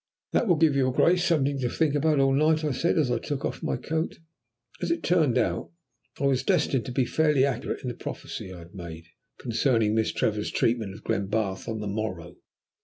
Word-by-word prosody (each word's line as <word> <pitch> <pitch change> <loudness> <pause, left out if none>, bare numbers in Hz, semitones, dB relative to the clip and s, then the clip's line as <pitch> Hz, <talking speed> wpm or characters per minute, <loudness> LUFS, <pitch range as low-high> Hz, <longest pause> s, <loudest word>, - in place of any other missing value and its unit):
"That 240 - +2
will 175 - +5
give 155 -2 +3
your 130 -2 +2
Grace 175 +7 +3
something 145 -5 +1
to 125 -2 0
think 155 +2 +1
about 150 0 +2
all 135 0 +4
night," 155 +3 +3
I 150 - 0
said, 165 +8 +1
as 145 -6 +2
I 120 - +1
took 140 +2 -4
off - - -4
my - - -1
coat. 160 +6 -3 0.6
As 175 - -1
it 170 - -1
turned 160 -8 +3
out, - - 0 0.5
I - - -3
was 135 -2 +2
destined 145 -5 +1
to 130 - -5
be 125 0 +1
fairly 150 -1 +3
accurate 130 -2 -3
in - - -4
the - - -3
prophecy 95 - -7
I 90 - -8
had 85 +2 -13
made 85 -3 -8 0.3
concerning 115 -3 +1
Miss 110 0 +1
Trevor's 105 -1 -1
treatment 110 -4 0
of - - -13
Glenbarth 100 0 -1
on 110 -2 -3
the 105 - -4
morrow. 100 -5 -4
130 Hz, 210 wpm, -26 LUFS, 110-150 Hz, 0.6 s, will